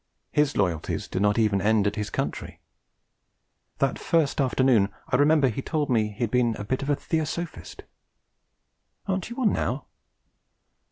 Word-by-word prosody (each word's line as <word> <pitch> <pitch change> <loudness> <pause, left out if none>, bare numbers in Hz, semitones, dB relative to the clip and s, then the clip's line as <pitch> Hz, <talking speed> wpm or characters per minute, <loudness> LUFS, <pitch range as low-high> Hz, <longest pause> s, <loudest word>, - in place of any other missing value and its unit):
His 150 -1 +1
loyalties 90 -6 -1
did 90 - -3
not 105 +1 +2
even 105 -4 +2
end 105 0 +3
at 100 - 0
his 105 -1 -3
country. - - -4 1.2
That - - 0
first 155 -4 +1
afternoon, 130 -6 +3 0.2
I - - +1
remember, 145 +1 +4
he 125 +2 -2
told 150 -1 -1
me 110 -3 +2
he 105 +3 -11
had 115 - -1
been 120 -3 +2
'a 105 - -6
bit 130 +6 -2
of 140 - -4
a 145 - +3
Theosophist.' 160 +3 -4 1.2
'Aren't 190 -1 -2
you 235 - -7
one 245 -6 +2
now?' 130 +2 -2
125 Hz, 160 wpm, -26 LUFS, 105-150 Hz, 1.2 s, remember